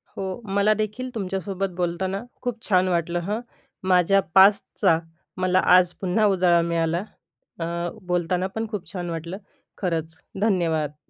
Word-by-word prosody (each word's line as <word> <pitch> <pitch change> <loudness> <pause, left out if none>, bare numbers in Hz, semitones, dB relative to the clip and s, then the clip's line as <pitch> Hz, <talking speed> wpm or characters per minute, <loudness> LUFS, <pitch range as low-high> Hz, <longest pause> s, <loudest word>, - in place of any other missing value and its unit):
हो. 190 +2 -4 0.2
मलादेखील 215 +4 +1
तुमच्यासोबत 195 -1 -2
बोलताना 185 +3 -2 0.2
खूप 240 -2 -4
छान 185 -2 +4
वाटलं 175 -1 0
हं, 205 +5 -2 0.5
माझ्या 185 +2 +4
पास्टचा 195 -4 +5 0.4
मला 185 0 +3 0.2
आज 180 -1 +2
पुन्हा 195 +3 +2
उजाळा 180 -4 +4
मिळाला. 170 +1 0 0.6
अ, 165 - -2 0.4
बोलताना 180 +1 0
पण 225 0 -2
खूप 205 -4 -6
छान 175 -2 -4
वाटलं. 170 +2 -5 0.4
खरंच. 165 -3 -2 0.2
धन्यवाद. 165 -8 +1
185 Hz, 125 wpm, -24 LUFS, 170-200 Hz, 0.6 s, पास्टचा